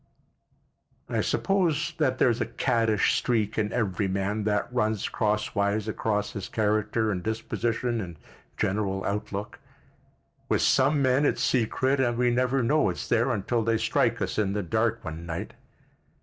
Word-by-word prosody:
I - - 0
suppose 180 -7 +1
that 130 -4 +2
there's 120 -2 +2
a - - 0
caddish 115 -3 +1
streak 110 -3 0
in 105 -1 0
every 105 -3 0
man 100 +2 -1
that 105 +3 0
runs 110 -4 0
crosswise 105 0 0
across 105 -1 -1
his 100 -3 -6
character 110 +1 0
and 90 -3 -2
disposition 115 +2 -2
and 85 -4 -7 0.4
general 95 -1 -1
outlook. 100 0 -4 0.9
With - - +2
some 140 +2 +3
men 130 +2 +3
it's - - +1
secret 130 +3 +1
and 120 -3 +1
we 125 0 +3
never 130 +1 +1
know 145 -2 +3
it's 90 - -4
there - - +2
until 115 +4 0
they 115 0 +1
strike 110 - +1
us - - -2
in 100 -2 +1
the 105 0 -1
dark 110 +5 0
one 80 +1 -6
night. 85 0 -5
110 Hz, 150 wpm, -27 LUFS, 100-120 Hz, 0.9 s, some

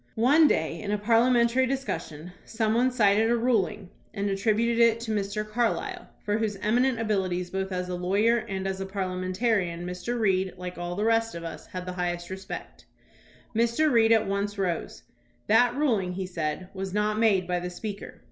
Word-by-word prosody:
One 285 +8 +5
day - - 0
in 205 - -5
a 210 - +1
parliamentary 235 +3 +3
discussion 180 - -4
some 220 -1 -1
one 245 +3 +3
cited 220 -2 +3
a 240 - +3
ruling 215 -5 0 0.2
and 200 0 -1
attributed 220 +4 +1
it 230 -1 +5
to 230 -1 -4
Mr. 210 0 -2
Carlisle, 245 - -2 0.2
for 210 +1 0
whose 215 -2 -1
eminent 235 +5 +1
abilities 185 -5 -1
both 190 0 -3
as 180 0 -2
a 180 - -4
lawyer 200 +6 +2
and 195 -4 -4
as 190 0 -3
a 190 - -4
parliamentarian 185 -1 -1
Mr. 180 +7 -4
Reed, 190 -3 +1
like 180 -1 -7
all 175 0 -4
the 205 +3 -1
rest 225 -2 +1
of 170 - -6
us, 165 - -8
had 180 -1 -6
the 180 - -5
highest 175 0 -3
respect. 190 0 -8 0.7
Mr. 235 +7 +2
Reed 225 -2 +4
at 220 -1 +4
once 200 +1 -2
rose. 175 - -3 0.4
"That 240 +3 +4
ruling," 220 -11 +1
he 190 +1 -3
said, 175 0 -4
"was 190 0 -5
not 210 +1 +1
made 200 -6 +3
by 180 -1 0
the 180 0 -4
Speaker. 200 +2 -7
205 Hz, 185 wpm, -27 LUFS, 185-230 Hz, 0.7 s, One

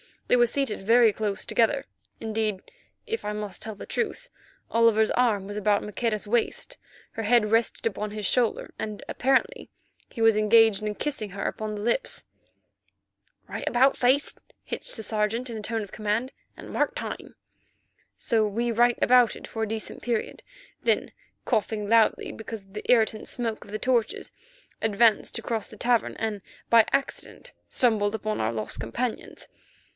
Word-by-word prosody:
They - - +4
were 240 0 +5
seated 275 -4 -1
very 230 +2 +5
close 210 -1 -3
together; 240 +4 +1 0.4
indeed, 215 -3 -2 0.3
if 455 0 -3
I 210 - -2
must 210 -2 -5
tell 220 -1 -4
the - - -9
truth, 480 +2 -3 0.4
Oliver's 225 -1 +4
arm 225 -6 +2
was 205 +1 -6
about 210 0 +2
Maqueda's 215 0 -2
waist, 360 - -1 0.3
her 225 - -5
head 215 -1 +3
rested 225 +1 +1
upon 210 -1 -2
his 210 -1 -5
shoulder, 240 +1 +1
and 210 -1 -5
apparently 270 - +1 0.4
he 230 - -7
was 225 -1 +5
engaged 215 -1 +5
in 210 0 -3
kissing 220 -8 -3
her 200 +1 -5
upon 215 -1 -3
the 205 - -5
lips. 350 - 0 1.2
"Right - - -6
about 260 +3 +4
face," 260 +4 +2 0.2
hissed - - -4
the 220 - -5
Sergeant, 220 +4 -1
in 225 - -5
a - - -5
tone 225 +1 -2
of 200 - -11
command, 220 +5 -1 0.3
"and - - -10
mark - - 0
time!" - - -6 0.8
So 220 -3 +1
we 235 +3 -1
right 240 +1 +3
abouted 245 -2 +4
for 225 - -3
a - - -1
decent 220 0 -5
period, 235 -3 -2 0.4
then, - - +1 0.3
coughing 210 -1 -1
loudly—because 225 -1 +1
of 195 0 -23
the 210 - -7
irritant 220 -3 +3
smoke 230 -3 -3
of - - -13
the 215 - -2
torches—advanced 235 - 0
to - - 0
cross 225 -3 -2
the 215 - -13
cavern, 240 +1 +1
and 215 -3 -3 0.3
by 230 -1 +7
accident 275 0 -2 0.2
stumbled 220 -4 +2
upon 215 0 -3
our 110 +1 0
lost 110 +2 -4
companions. 220 - -4
220 Hz, 160 wpm, -26 LUFS, 210-240 Hz, 1.2 s, by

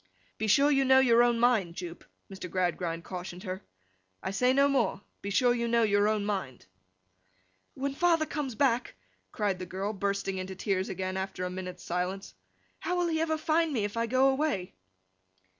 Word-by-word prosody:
'Be 220 - -1
sure 280 +7 +5
you 275 -1 +3
know 265 0 +5
your 240 -3 +6
own 240 -1 +3
mind, 220 -8 +2
Jupe,' 175 -1 -7 0.2
Mr. 190 -2 -8
Gradgrind 175 -2 -1
cautioned 180 0 -7
her; 185 -2 -5 0.6
'I - - -2
say 250 +6 +2
no 275 +2 +4
more. 245 -8 +1 0.2
Be 200 - -4
sure 245 +4 +3
you 235 -1 -1
know 235 0 +3
your 205 -1 +3
own 215 -1 0
mind!' 190 - -3 1.1
'When 275 +1 -2
father 330 +1 +3
comes 285 -6 -4
back,' 250 - +1 0.4
cried 200 -3 -1
the 185 - -6
girl, 195 +4 -3
bursting 195 -1 -2
into 185 0 -5
tears 190 -1 -1
again 185 0 -3
after 190 -1 -3
a 180 - -3
minute's 185 0 -7
silence, 180 +3 -3 0.5
'how 360 - -2
will 350 -1 +1
he 320 -1 0
ever 315 -1 0
find 320 +1 +1
me 235 -7 0
if 205 - -5
I 230 0 0
go 260 +3 +4
away! 270 -9 -1
210 Hz, 185 wpm, -29 LUFS, 185-265 Hz, 1.1 s, your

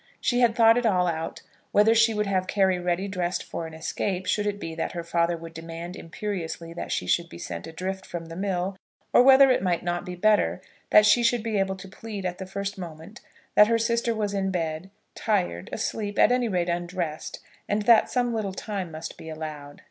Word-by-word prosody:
She 245 -1 +1
had 235 -2 +4
thought 230 0 +6
it 245 - -3
all 180 -4 +3
out, 165 -1 -3 0.3
whether 210 +2 +5
she 225 0 +5
would 210 -1 0
have 190 -2 0
Carry 190 -2 +2
ready 180 +2 -1
dressed 180 -2 -2
for 165 - -5
an 160 - -10
escape, 185 +3 -3
should 210 +2 0
it 205 0 -2
be 165 -4 -5
that 165 - -3
her 170 -1 -4
father 170 0 +1
would 165 0 -10
demand 165 +2 -7
imperiously 165 -2 -5
that 170 - -6
she - - -1
should 170 - +1
be - - -10
sent 85 0 -6
adrift 190 +3 -5
from 170 -1 -6
the 165 0 -9
mill, 190 0 -2 0.4
or - - +8
whether 270 +1 +7
it 255 - +2
might 180 -2 0
not 175 0 -2
be 180 - -6
better 210 +3 +2 0.3
that 210 - +7
she 240 - +5
should 235 -1 +2
be 220 -3 0
able 190 0 0
to 190 +1 -10
plead 205 0 -7
at 180 -1 -3
the 190 - -6
first 200 +1 -4
moment 170 +5 -9 0.3
that 210 - +7
her 230 0 +3
sister 235 0 0
was 210 -2 -1
in 195 -1 0
bed, 165 -1 -3 0.2
tired, 180 - -1
asleep, 210 -2 -3
at - - +5
any 250 -1 +2
rate 180 -4 0
undressed, 175 -2 -3 0.3
and 205 +1 +1
that 230 +1 +5
some 245 -1 0
little 210 -4 -2
time 195 -4 -4
must 160 0 -8
be 160 - -9
allowed. 155 -2 -7
190 Hz, 215 wpm, -26 LUFS, 170-210 Hz, 0.4 s, or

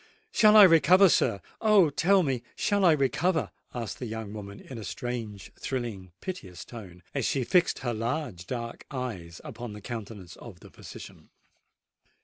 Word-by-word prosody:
"Shall 215 -1 +6
I 210 - +11
recover, 180 +2 +7
sir! 110 - +2 0.2
Oh! 205 -8 +5
tell 190 +6 +3
me—shall 150 - -1
I 170 - +7
recover?" 155 +4 0 0.2
asked 115 -3 -5
the 125 - -4
young 110 -2 -6
woman 100 -1 -8
in 130 -4 -9
a - - -7
strange, 110 -2 -5
thrilling, 115 -8 -4
piteous 100 - -7
tone, 95 -7 -11
as 140 - -1
she 130 +3 0
fixed 175 +8 +2
her 120 - 0
large 115 - -3
dark 115 -2 -6
eyes 105 - -6
upon 120 -3 -7
the 105 - -9
countenance 105 -5 -8
of 95 -7 -12
the - - -14
physician. - - -12
120 Hz, 155 wpm, -28 LUFS, 105-160 Hz, 0.2 s, I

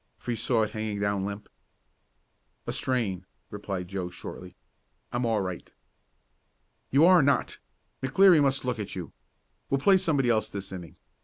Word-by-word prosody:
for 120 - -5
he - - 0
saw 115 0 +1
it 110 - -3
hanging 110 -1 -3
down 100 -1 0
limp. 100 +1 -5 1.2
"A - - -3
strain," 100 -8 -1 0.2
replied 100 -3 -5
Joe 95 -1 -4
shortly. - - -9 0.6
"I'm 120 0 -1
all 110 -3 +1
right." 90 -2 -6 1.2
"You 145 +5 +5
are 180 -1 +7
not! 140 -1 +1 0.4
McLeary 165 +5 +5
must 135 -2 +1
look 125 -3 -2
at 105 - -5
you. 90 -3 -7 0.6
We'll 135 - +2
play 190 +7 +5
somebody 155 -8 +1
else 110 -1 +1
this 100 -1 -6
inning. 90 -3 -8
110 Hz, 155 wpm, -27 LUFS, 100-135 Hz, 1.2 s, are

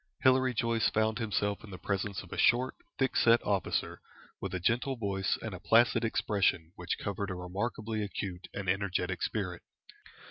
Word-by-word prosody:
Hilary 130 -1 +4
Joyce 115 0 +2
found 110 +1 +1
himself 105 -2 -1
in 110 - -10
the 95 - -7
presence 100 0 -2
of - - -11
a - - -5
short, 125 +2 +4 0.2
thick 135 - +1
set 115 0 +6
officer, 100 -5 -1 0.4
with - - -3
a - - -1
gentle 120 +8 +1
voice 100 -4 -1
and 110 -3 -4
a 90 - -6
placid 115 +5 +4
expression 100 -7 +1
which 90 -1 -3
covered 100 0 -3
a 95 - -3
remarkably 105 +4 -3
acute 95 -3 -4
and 100 -2 -5
energetic 95 -2 0
spirit. 90 -5 -2
100 Hz, 170 wpm, -31 LUFS, 95-115 Hz, 0.4 s, set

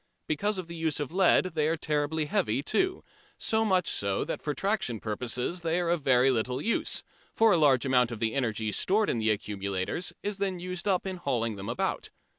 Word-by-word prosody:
Because 205 +7 -1
of 185 - -4
the 170 0 -8
use 160 -3 -1
of 145 0 -3
lead 185 -1 +3
they 155 -2 +1
are 165 +1 0
terribly 150 0 -1
heavy 125 -2 0
too, 370 - 0 0.3
so 220 0 +1
much 185 -5 +2
so 100 -1 0
that - - -4
for 150 - -2
traction 195 - -1
purposes 125 - -2
they 165 +1 0
are 175 -1 0
of 170 -2 0
very 130 -1 +4
little 125 +1 -1
use, 230 +10 -1 0.3
for 225 -1 +5
a 175 - +5
large 140 -5 +4
amount 125 -3 +3
of 120 - -5
the 110 +1 -1
energy 115 -5 -1
stored 205 - +2
in 115 - -1
the 110 0 +1
accumulators 100 - -2
is 205 -1 -3
then 190 -3 -1
used 180 +1 -4
up 190 -2 +1
in 190 -1 -3
hauling 120 -9 -1
them 100 0 -6
about. - - -2
150 Hz, 210 wpm, -28 LUFS, 120-185 Hz, 0.3 s, for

